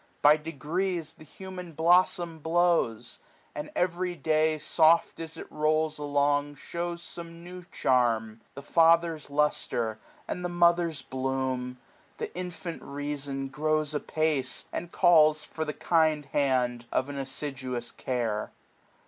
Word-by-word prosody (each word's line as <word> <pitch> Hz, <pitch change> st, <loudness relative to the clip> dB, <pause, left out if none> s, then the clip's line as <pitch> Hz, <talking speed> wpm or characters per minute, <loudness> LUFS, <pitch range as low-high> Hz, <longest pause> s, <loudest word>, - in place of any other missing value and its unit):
By 145 Hz, +1 st, +8 dB
degrees^ 160 Hz, +2 st, -3 dB
The -, -, -13 dB
human 180 Hz, +1 st, -9 dB
blossom 170 Hz, 0 st, +3 dB
blows; 165 Hz, -8 st, +1 dB, 0.3 s
and 150 Hz, -, -5 dB
every 180 Hz, 0 st, 0 dB
day. 155 Hz, 0 st, +2 dB
Soft 160 Hz, +2 st, +3 dB
as 165 Hz, -1 st, -5 dB
it -, -, -7 dB
rolls 155 Hz, 0 st, +1 dB
along, 145 Hz, 0 st, +1 dB
shews 170 Hz, +3 st, -5 dB
some 170 Hz, 0 st, -8 dB
new 180 Hz, +1 st, -9 dB
charm^ 115 Hz, -, +1 dB
^^4$ -, -, -27 dB, 0.2 s
The 140 Hz, -, -8 dB
father's 165 Hz, 0 st, +3 dB
lustre, 120 Hz, -6 st, 0 dB, 0.3 s
and 180 Hz, -, -4 dB
the 175 Hz, -, -1 dB
mother's 170 Hz, -3 st, +2 dB
bloom. 130 Hz, -1 st, -2 dB, 0.4 s
The -, -, -5 dB
infant 180 Hz, -1 st, -5 dB
reason 140 Hz, -1 st, -4 dB
grows 155 Hz, +1 st, 0 dB
apace, 150 Hz, -3 st, -1 dB
and 175 Hz, -, -4 dB
calls 155 Hz, -4 st, +5 dB
For 160 Hz, -, -4 dB
the 150 Hz, -, -2 dB
kind 155 Hz, -3 st, +2 dB
hand 125 Hz, -4 st, 0 dB
of 130 Hz, -, 0 dB
an 140 Hz, -, -5 dB
assiduous 130 Hz, -3 st, -4 dB
care. 115 Hz, -4 st, -2 dB
155 Hz, 130 wpm, -28 LUFS, 135-170 Hz, 0.4 s, By